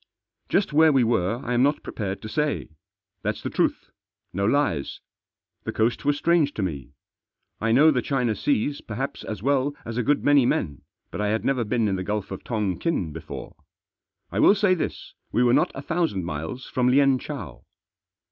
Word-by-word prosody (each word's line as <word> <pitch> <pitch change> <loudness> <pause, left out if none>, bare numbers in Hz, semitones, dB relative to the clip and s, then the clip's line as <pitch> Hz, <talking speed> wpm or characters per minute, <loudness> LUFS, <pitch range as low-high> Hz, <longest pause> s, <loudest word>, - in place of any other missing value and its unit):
Just 195 -6 +1
where 160 +1 +6
we 135 -3 +4
were 115 -1 +1
I 125 - -1
am 120 - +3
not 145 +3 +2
prepared 100 -2 -5
to - - -5
say. 150 - -1 0.5
Thaf - - 0
s - - -12
the - - -3
truth. - - -1 0.4
No 100 +2 0
lies! 110 - 0 0.6
The - - -3
coast 115 +4 0
was 145 0 +2
strange 165 -3 +2
to 105 - -2
me. 70 -6 -5 0.7
I 115 +1 0
know 150 +7 +6
the 125 -4 +1
China 125 -4 0
Seas 200 - 0
perhaps 125 +5 -5
as 105 -2 -6
well 140 +1 +1
as 115 0 -5
a 125 - +1
good 145 +4 +1
many 145 -2 +5
men, 75 - -1 0.3
but - - -4
I 105 - +1
had 110 +2 -1
never 130 -3 +1
been 115 0 0
in 95 -2 0
the 95 - -3
Gulf 105 0 -3
of 95 - -6
Tongkin 105 - -1
before. 80 - -8 0.8
I - - -2
will 200 - +6
say 200 -2 +3
this, 180 - -4 0.2
we 125 - +2
were 120 -1 +4
not - - +3
a 135 - -6
thousand 160 - -1
miles 80 - -5
from 125 -1 0
Lienchow. 135 - +1
125 Hz, 190 wpm, -25 LUFS, 105-145 Hz, 0.8 s, where